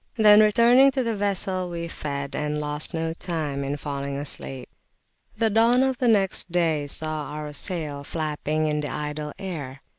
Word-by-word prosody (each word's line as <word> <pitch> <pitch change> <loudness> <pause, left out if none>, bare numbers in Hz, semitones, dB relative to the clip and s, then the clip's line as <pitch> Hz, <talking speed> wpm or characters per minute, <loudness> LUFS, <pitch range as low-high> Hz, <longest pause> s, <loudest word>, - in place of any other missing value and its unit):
Then 210 -2 +7
returning 235 +5 +6
to 260 -1 0
the 230 -2 -1
vessel 190 -2 -1
we 170 -1 -4
fed, 140 -4 -5
and 150 0 -2
lost 150 0 -2
no 160 0 -2
time 155 -5 -3
in 140 +1 -3
falling 140 -1 -4
asleep. 135 -2 -4 0.7
The 225 -1 +2
dawn 230 +4 +4
of 265 -2 0
the 250 - +2
next 195 -5 +2
day 160 -4 +1
saw 155 +1 -2
our 150 +1 -6
sail 150 -3 -3
flapping 155 0 -2
in 150 -1 0
the 145 - -3
idle 150 0 -4
air. 145 -8 -6
155 Hz, 170 wpm, -25 LUFS, 150-200 Hz, 0.7 s, Then